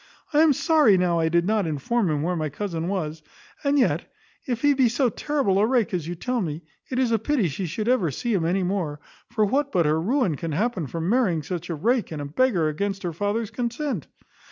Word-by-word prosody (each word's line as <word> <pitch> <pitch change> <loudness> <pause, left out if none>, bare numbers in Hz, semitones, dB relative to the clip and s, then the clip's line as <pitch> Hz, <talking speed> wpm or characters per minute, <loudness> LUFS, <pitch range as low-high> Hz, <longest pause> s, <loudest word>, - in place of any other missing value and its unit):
I 295 - +5
am 320 -1 +6
sorry 290 - +4
now 175 -2 +2
I 160 0 +2
did 170 +1 +2
not 210 -2 +1
inform 175 - 0
him 150 -1 0
where 180 +2 0
my 155 -2 -2
cousin 170 +1 -4
was; 160 -5 -3 0.4
and 285 0 +2
yet, 265 - +1 0.4
if 245 -1 -2
he 290 0 +5
be 260 -3 +3
so 245 +2 +1
terrible 265 -7 0
a 210 - +3
rake 240 -5 +1
as 170 -4 -2
you 175 - -4
tell 250 +7 -2
me, 160 -2 -4 0.3
it 255 - -3
is 255 -2 +2
a 225 - +2
pity 235 -3 +1
she 175 +5 -4
should 210 +7 -3
ever 240 -10 +2
see 230 - -2
him 185 -5 +1
any 180 +3 +1
more; 175 -6 -2 0.3
for 220 -2 +1
what 280 +6 0
but 175 -3 +2
her 155 +2 +2
ruin 215 - +1
can 165 +1 -4
happen 195 - -1
from 165 +4 -4
marrying 195 -8 +2 0.3
a 170 - -2
rake 230 - 0
and 155 - -5
a 145 - -4
beggar 175 - +1
against 195 +6 -2
her 175 -2 -2
father's 205 +5 -2
consent? 245 - -3
200 Hz, 225 wpm, -24 LUFS, 165-245 Hz, 0.4 s, am